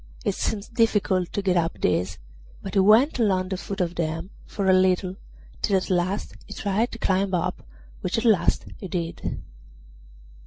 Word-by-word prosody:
It - - +2
seemed 215 +2 -3
difficult 210 -6 +2
to 200 - -1
get 185 -2 +2
up 165 -1 0
these, 90 0 0 0.5
but - - -6
he - - +3
went 220 +9 +5
along 190 -4 +2
the 190 - -2
foot 200 +2 -6
of 175 -2 0
them 165 +2 -3 0.2
for 200 -2 -2
a 190 - +6
little, 185 0 +2 0.5
till 195 - +3
at 185 - -3
last 185 +3 0
he - - -8
tried 210 +4 0
to - - -5
climb 190 -2 +1
up, 180 +1 -2 0.4
which 185 +5 -2
at 225 - -1
last 205 -7 +3
he 190 - -6
did. 170 -2 -4
190 Hz, 180 wpm, -25 LUFS, 180-205 Hz, 0.5 s, a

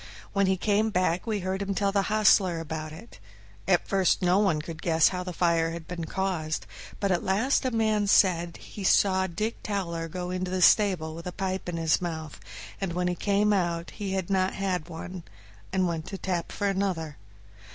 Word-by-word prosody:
When 200 -1 +2
he 190 0 +2
came 210 +3 +1
back 185 0 0
we 215 -3 -1
heard 190 +2 -2
him 200 0 -2
tell 200 0 +1
the 200 0 +2
hostler 200 -5 +4
about 160 -1 -5
it. 175 - -12 0.5
At 180 -2 +2
first 190 -2 +2
no 180 +2 +4
one 195 -7 +2
could 160 0 -7
guess 165 -2 +4
how 180 -1 -3
the 180 - -5
fire 170 -1 +2
had 165 -1 -8
been 175 -2 -5
caused, 160 -3 -2 0.3
but 200 -1 0
at 175 - +1
last 220 +9 +1
a - - +2
man 215 -3 +1
said 175 -4 +3
he 205 - -9
saw 190 0 +3
Dick 215 +6 -3
Towler 170 -5 -3
go 180 +2 -5
into 185 0 -2
the 185 0 0
stable 180 -7 +4
with 165 +2 -8
a - - -3
pipe 190 0 -3
in 170 - -3
his 160 0 +2
mouth, 160 -3 -5 0.4
and 190 -3 -2
when 180 +1 0
he - - 0
came 205 +3 +2
out 170 -3 -1
he 200 -3 -4
had 190 -1 -2
not 190 -1 +2 0.4
one, 175 +2 -7 0.5
and 185 -1 +1
went 165 0 -3
to - - -8
the - - -3
tap 180 -3 -3
for 205 - -1
another. 185 -6 -1
185 Hz, 205 wpm, -27 LUFS, 170-195 Hz, 0.5 s, hostler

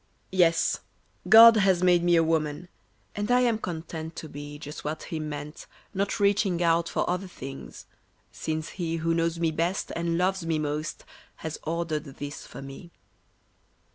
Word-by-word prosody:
Yes, 170 -3 +3 0.5
God 225 +1 +10
has 190 -3 +3
made 175 -1 +4
me 175 0 +4
a 165 - +5
woman, 160 +1 -1 0.5
And 205 +2 -2
I 250 0 +4
am 235 -3 +2
content 160 -3 -6
to 160 - -7
be 145 0 -8
Just 150 0 -8
what 155 +1 -4
He 160 - -5
meant, 150 -1 -6 0.3
not 200 +1 -1
reaching 200 -3 +2
out 170 0 +2
For - - -1
other 180 +2 -1
things, 135 -6 -9 0.5
since 155 0 -4
He 165 -3 -3
Who 165 0 0
knows 165 0 0
me 165 -1 +1
best 170 +4 -1
and 170 0 -1
loves 185 +1 +1
me 165 -1 0
most 150 0 -3 0.4
has 160 - -4
ordered 165 -1 -2
this 145 +1 -8
for 135 - -9
me. 135 +5 -10
165 Hz, 165 wpm, -27 LUFS, 155-180 Hz, 0.5 s, God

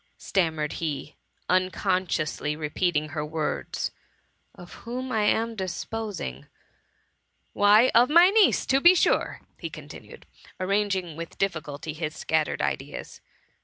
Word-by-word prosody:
^* - - -41
stammered 160 -5 -1
he, 150 -2 -4 0.3
unconsciously 185 -5 0
repeating 155 0 -1
her 150 +1 -3
words, 155 0 -3 0.3
" - - -37
Of 175 - -12
whom 255 +2 -5
I 220 -3 +1
am 225 +2 +1
disposing? 190 - -5 1.1
Why, 210 +5 +5
of 240 +2 +5
my 340 +4 +7
niece, 430 0 +4
to 270 +1 +2
be 350 +4 +8
sure,^ - - +1
he - - -5
continued, - - -12 0.3
arranging 190 -3 0
with 165 +1 -8
difficulty 155 -5 -3
his 155 0 -4
scattered 155 -1 -1
ideas. - - -4
185 Hz, 125 wpm, -26 LUFS, 155-220 Hz, 1.1 s, be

